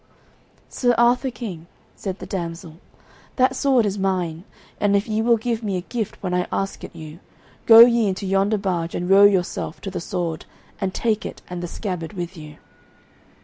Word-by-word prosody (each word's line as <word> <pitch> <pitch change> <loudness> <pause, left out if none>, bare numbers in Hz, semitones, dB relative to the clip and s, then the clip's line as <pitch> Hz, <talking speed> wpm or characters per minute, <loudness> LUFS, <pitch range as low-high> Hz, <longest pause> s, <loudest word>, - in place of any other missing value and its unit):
"Sir 245 -2 +1
Arthur 245 +3 +3
King," 190 -10 -7 0.3
said 190 -2 -5
the - - -8
damsel, 170 -3 -6 0.6
"that 260 0 +2
sword 260 -4 +3
is 200 0 -2
mine, 180 -3 -1 0.3
and 205 -1 +2
if 200 +3 +1
ye 215 0 0
will 235 0 +3
give 230 0 -2
me 200 -4 -2
a - - -3
gift 220 +3 -4
when 180 -2 -2
I 180 0 0
ask 195 0 -3
it - - -9
you, 155 +1 -10 0.5
go 225 0 +10
ye 235 -2 +6
into 195 +1 -3
yonder 195 +3 +1
barge 180 -4 -2
and 175 - -3
row 195 +2 +7
yourself 185 -5 0
to 195 - -5
the 180 - -4
sword, 170 -3 -3 0.3
and 195 -2 -1
take 220 +1 -1
it - - -8
and 180 -1 -4
the 175 - -4
scabbard 180 -2 -5
with 175 -1 -5
you." 150 -2 -11
195 Hz, 190 wpm, -22 LUFS, 175-225 Hz, 0.6 s, go